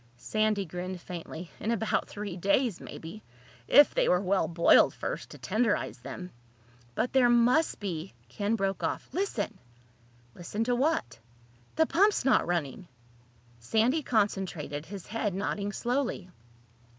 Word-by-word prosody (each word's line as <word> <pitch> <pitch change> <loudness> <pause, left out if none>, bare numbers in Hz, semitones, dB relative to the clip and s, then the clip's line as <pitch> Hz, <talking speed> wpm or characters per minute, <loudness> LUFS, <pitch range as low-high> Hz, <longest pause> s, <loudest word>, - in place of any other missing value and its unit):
Sandy 215 - 0
grinned 180 +2 -5
faintly. 170 -1 -8
"In 215 - -3
about 225 -1 0
three 205 -3 -5
days, 200 +3 +1
maybe—if 125 - +1
they - - +2
were 180 - +4
well 190 -3 +1
boiled 170 0 +5
first, - - -5
to - - -11
tenderize 220 - 0
them." 180 +8 -7 0.6
"But 245 - -1
there 255 -2 +5
must 240 +7 +3
be—" 180 - -5
Ken 205 - -1
broke 195 -2 -1
off. - - -2
"Listen!" 365 - -2 0.7
"Listen 205 +5 -3
to 245 +1 +1
what?" 240 - 0 0.6
"The 320 - +4
pump's 395 - +3
not 265 - +3
running!" 170 0 -2 0.7
Sandy 225 - +2
concentrated, 190 - -1
his 195 0 -8
head 215 -3 -2
nodding 200 +1 -2
slowly. 240 -5 -2
200 Hz, 130 wpm, -29 LUFS, 175-235 Hz, 0.7 s, boiled